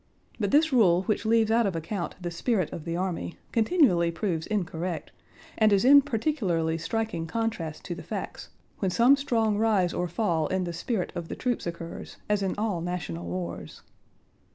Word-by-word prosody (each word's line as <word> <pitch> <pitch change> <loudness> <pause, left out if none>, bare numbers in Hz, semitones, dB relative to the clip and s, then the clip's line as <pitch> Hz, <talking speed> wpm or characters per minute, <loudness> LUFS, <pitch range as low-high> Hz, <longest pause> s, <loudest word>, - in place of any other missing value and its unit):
But 205 -3 0
this 305 +3 +3
rule 185 -7 +5
which 215 +2 -1
leaves 225 -1 +3
out 230 -1 +3
of 190 - -2
account 170 +3 -4
the 175 -1 -4
spirit 185 - 0
of 155 - -7
the 170 0 -2
army 175 - -3
continually 220 - +3
proves 170 -2 -2
incorrect 180 -4 -3 0.5
and 215 -1 +5
is 200 +3 +3
in 285 +2 +9
particularly 210 - -1
striking 195 -2 -2
contrast 195 -6 -3
to 175 - -3
the - - -8
facts - - -6 0.3
when 190 - +1
some 240 +9 +5
strong 225 -7 0
rise 205 -6 +2
or 180 - -1
fall 170 -4 0
in 190 0 0
the 175 -1 -4
spirit 185 +3 -2
of 170 -1 -5
the - - -5
troops 245 -7 -2
occurs, 170 0 -7
as 210 -1 +1
in 190 -1 -1
all 205 -5 -1
national 150 - -4
wars. 85 -1 -6
190 Hz, 175 wpm, -27 LUFS, 170-225 Hz, 0.5 s, in